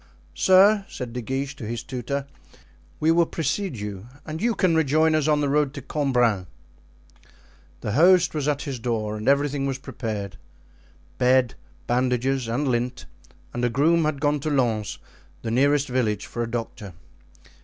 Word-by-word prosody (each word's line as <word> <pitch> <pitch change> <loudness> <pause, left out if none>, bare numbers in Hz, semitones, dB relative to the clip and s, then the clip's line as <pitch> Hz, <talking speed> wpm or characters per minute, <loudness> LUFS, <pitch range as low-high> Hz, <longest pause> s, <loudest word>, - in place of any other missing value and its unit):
"Sir," 195 +2 +5
said 125 -3 -6
De 125 - -3
Guiche 135 +4 -3
to - - -9
his 115 +1 -4
tutor, 135 +2 -4 0.7
"we 160 +1 +3
will 170 0 +3
precede 165 +2 -2
you, 105 0 -6 0.2
and 160 +1 -6
you 235 -1 +1
can 185 -3 +2
rejoin 160 0 +3
us 155 -1 +1
on 150 -1 +3
the 145 - +1
road 145 0 +1
to 140 - -6
Cambrin." 125 - +1 1.3
The 105 - -3
host 180 - +5
was 150 -2 -2
at 145 -1 0
his 135 -5 -5
door 110 -2 -2
and 110 +2 -6
everything 140 0 +1
was 135 -1 -2
prepared—bed, 115 +3 -3 0.3
bandages, 125 +1 0
and 130 +6 -1
lint; 125 0 -1 0.5
and 120 - -3
a 120 - +3
groom 160 +7 +3
had 150 -2 -1
gone 145 0 +1
to 155 - -3
Lens, 120 -7 0 0.5
the 115 - -3
nearest 140 +4 +3
village, 110 -5 -1
for 120 - -5
a 115 - -2
doctor. 115 -4 -5
135 Hz, 160 wpm, -24 LUFS, 120-150 Hz, 1.3 s, Sir